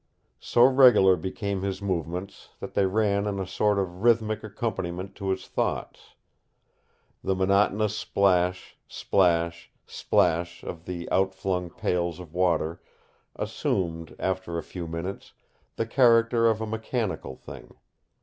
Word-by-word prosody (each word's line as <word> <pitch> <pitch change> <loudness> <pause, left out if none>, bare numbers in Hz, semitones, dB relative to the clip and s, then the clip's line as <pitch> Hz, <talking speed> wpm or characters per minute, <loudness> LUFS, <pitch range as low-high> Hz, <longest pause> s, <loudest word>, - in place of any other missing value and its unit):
So 120 - +3
regular 125 -8 +7
became 95 +3 -4
his 95 -1 -3
movements 90 -1 -4
that - - -7
they 100 - +2
ran 100 0 +1
in 100 -1 -2
a 95 - -2
sort 105 +2 +1
of 90 -2 -3
rhythmic 110 -2 +2
accompaniment 95 -4 -4
to 100 -1 -3
his 95 - -2
thoughts. - - -3 1.1
The 95 - 0
monotonous 100 +2 +2
splash, 90 -4 +1
splash, 85 -3 +1 0.2
splash 85 +1 0
of 85 0 -7
the 90 -2 -5
outflung 95 -1 0
pails 85 -1 -2
of 85 -3 -11
water 85 -2 0 0.5
assumed, 85 -3 -2
after 95 -2 -2
a 85 - -3
few 85 0 -7
minutes, 85 +4 -6 0.4
the 115 - -1
character 115 -1 +4
of 110 -1 0
a - - -1
mechanical 110 - -3
thing. - - -12
95 Hz, 130 wpm, -26 LUFS, 90-105 Hz, 1.1 s, regular